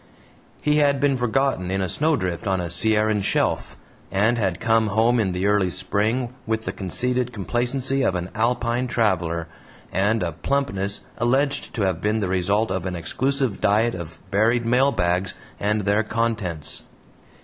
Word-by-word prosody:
He 150 0 +3
had 140 -2 +3
been 140 -1 +2
forgotten 125 -5 0
in 95 +1 0
a 95 - 0
snowdrift 100 - 0
on 95 -1 +1
a 85 -1 -4
Sierran 110 +3 +2
shelf, - - 0 0.3
and 105 +5 +2
had 95 -4 0
come 115 -1 +2
home 115 +4 +3
in 100 -4 +1
the 90 +2 -2
early 100 -2 +3
spring 110 +7 -1
with 110 0 -1
the - - -1
conceited 125 +6 -1
complacency 125 +5 -1
of 95 - +1
an 90 +1 -4
Alpine 120 +2 0
traveler 85 -8 0 0.4
and 105 +2 +1
a 85 - -1
plumpness 100 - -1 0.2
alleged 135 +4 0
to 110 - 0
have 95 -3 0
been 105 +1 +1
the 100 - -1
result 95 +4 +1
of 95 -1 -2
an 90 - -3
exclusive 130 - -1
diet 110 +3 +3
of 85 -1 -8
buried 115 +4 +2
mail 130 +4 +3
bags 90 -2 0 0.2
and 105 +1 +1
their 100 +2 +2
contents. 110 -8 -2
110 Hz, 160 wpm, -23 LUFS, 95-120 Hz, 0.4 s, He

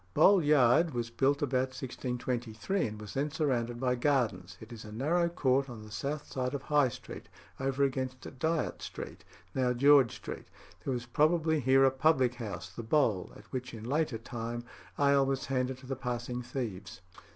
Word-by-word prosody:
Bowl 195 -4 +6
Yard 145 +1 +4
was 115 -1 -2
built 140 +4 +2
about 130 -1 0
1623, 125 - -2
and 105 0 -7
was 105 -1 -8
then 140 +2 0
surrounded 120 -6 -1
by 125 -1 +1
gardens. 115 - 0
It 110 +2 -10
is 115 - -9
a 105 - -9
narrow 165 +10 +1
court 135 -4 +1
on 115 -3 -8
the 105 - -12
south 140 +7 -3
side 130 0 -3
of 140 - -5
High 145 -3 +3
Street, - - -10 0.3
over 135 +1 0
against 130 -1 -1 0.2
Dyot 160 +2 0
Street, - - -7 0.3
now 125 -2 +1
George 140 -1 +5
Street. - - -8 0.4
There 135 - -1
was 120 -1 -3
probably 160 +4 +2
here 135 0 +4
a 135 - +5
public 130 -2 +3
house, 115 -5 -6
the - - -6
Bowl, 110 -6 +1
at 105 - -14
which 125 -2 -4
in 110 - -9
later 140 0 0
time 120 0 -5 0.3
ale 140 -1 +4
was 135 0 -1
handed 130 -1 -1
to 130 - -14
the 135 +1 -3
passing 125 -1 -3
thieves. 115 -6 -5
130 Hz, 180 wpm, -31 LUFS, 120-140 Hz, 0.4 s, Bowl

